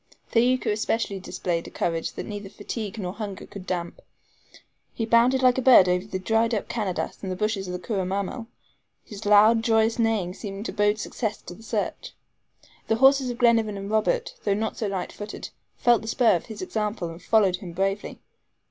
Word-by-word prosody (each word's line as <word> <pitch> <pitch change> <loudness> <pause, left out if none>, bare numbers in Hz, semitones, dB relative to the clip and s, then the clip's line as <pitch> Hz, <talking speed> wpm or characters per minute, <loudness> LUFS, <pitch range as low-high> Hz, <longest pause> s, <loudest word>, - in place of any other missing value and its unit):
Thaouka 250 +1 +2
especially 215 -1 -1
displayed 175 -2 -3
a - - -7
courage 165 -1 -2
that - - -6
neither 205 -2 -6
fatigue 220 +1 -6
nor 185 -3 -4
hunger 205 -2 -6
could 190 -2 -10
damp. 175 -2 -3 1.0
He 225 - -1
bounded 240 +3 +4
like 255 0 +5
a - - 0
bird 245 -7 +7
over 180 +2 0
the 190 - -3
dried 225 +4 +1
up 205 - -3
CANADAS 205 -6 -3
and 190 - -4
the - - -2
bushes 205 -1 -1
of 180 0 -4
CURRA 195 -5 -2
MAMMEL, 200 +5 -3 0.6
his 210 0 -8
loud, 215 +2 +6
joyous 225 0 +2
neighing 220 -6 +1
seeming 200 0 -7
to - - -5
bode 205 +1 +2
success 215 0 -3
to - - -9
the 210 - -15
search. 220 -2 -4 0.7
The 225 - +2
horses 270 +1 +5
of 240 - -4
Glenarvan 225 -4 +3
and 195 +1 -6
Robert, 480 - +1
though 200 -2 +1
not 220 +1 -2
so 215 - -2
light 190 -2 -3
footed, 210 0 -7 0.3
felt 240 -1 +4
the 220 - -9
spur 230 -3 +3
of 170 - -4
his 220 +9 -7
example, 210 - -2
and 165 +2 -10
followed 200 -5 +3
him 180 -2 -9
bravely. 195 +3 -2
210 Hz, 190 wpm, -25 LUFS, 195-230 Hz, 1.0 s, bird